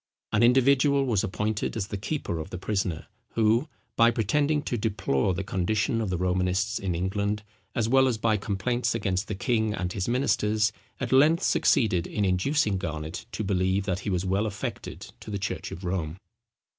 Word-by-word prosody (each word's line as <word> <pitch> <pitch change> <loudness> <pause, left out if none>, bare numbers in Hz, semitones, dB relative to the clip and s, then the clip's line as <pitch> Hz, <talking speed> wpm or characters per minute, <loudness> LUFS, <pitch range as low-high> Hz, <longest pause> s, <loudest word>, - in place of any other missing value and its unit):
An 105 - +2
individual 135 +3 +4
was 110 -7 +1
appointed 105 +3 -2
as 100 -2 -3
the - - -3
keeper 100 - -3
of 80 - -6
the 90 - -5
prisoner, 95 -4 -2 0.3
who, 115 +5 +3 0.3
by 115 0 +6
pretending 145 +7 +1
to - - -2
deplore 95 - 0
the 95 - -2
condition 100 +4 0
of 105 - -2
the 90 - -1
Romanists 90 +5 0
in 95 -3 -2
England, 100 +4 -1 0.3
as 115 -2 +1
well 130 +2 +5
as 120 -3 0
by 110 0 +2
complaints 105 +5 -1
against 95 -1 -1
the 105 - -3
king 110 0 0
and 90 -2 -3
his 95 - -2
ministers, 110 -4 +2 0.3
at 130 - -3
length 150 +7 +5
succeeded 90 -7 +2
in 105 - -1
inducing 100 +2 +1
Garnet 80 -2 -5
to 110 - -2
believe 95 0 +1
that 95 -1 -1
he 100 - -4
was 90 -1 0
well 95 +3 +1
affected 105 -1 -5 0.2
to - - -10
the 100 - -2
church 95 -1 -4
of 90 - -8
Rome. 90 -3 -2
105 Hz, 180 wpm, -27 LUFS, 95-115 Hz, 0.3 s, by